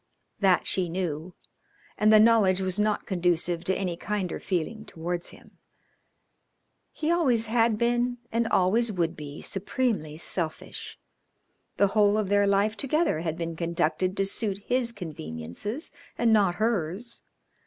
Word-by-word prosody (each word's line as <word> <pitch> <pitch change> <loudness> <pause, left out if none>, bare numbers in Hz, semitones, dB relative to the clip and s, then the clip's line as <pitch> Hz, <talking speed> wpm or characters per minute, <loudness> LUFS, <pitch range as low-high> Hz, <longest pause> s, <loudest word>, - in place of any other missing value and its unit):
That 190 -3 +3
she 180 -2 0
knew, 170 -1 -4 0.6
and 215 0 +4
the 215 - +8
knowledge 215 -4 +5
was 190 +1 0
not 210 0 +1
conducive 175 -2 0
to 190 - +2
any 180 -3 -2
kinder 195 0 -3
feeling 195 +5 -3
towards 175 -2 -5
him. - - -17 1.3
He 315 +1 -1
always 260 -10 +2
had 225 -1 +2
been 240 +1 +1
and 230 0 +1
always 220 +6 +2
would 170 -4 -1
be 145 -1 -8
supremely 195 - -1
selfish. 165 -1 -3 0.8
The 200 - +4
whole 210 0 +3
of 210 -3 -1
their 205 0 +3
life 200 +2 +2
together 305 - 0
had 160 -1 -3
been 165 -1 -4
conducted 170 +3 -1
to 195 - +2
suit 200 0 -1
his 245 -1 +1
conveniences 155 - -5 0.3
and 230 -2 +3
not 195 -5 +3
hers. 215 +1 -1
195 Hz, 140 wpm, -27 LUFS, 175-225 Hz, 1.3 s, the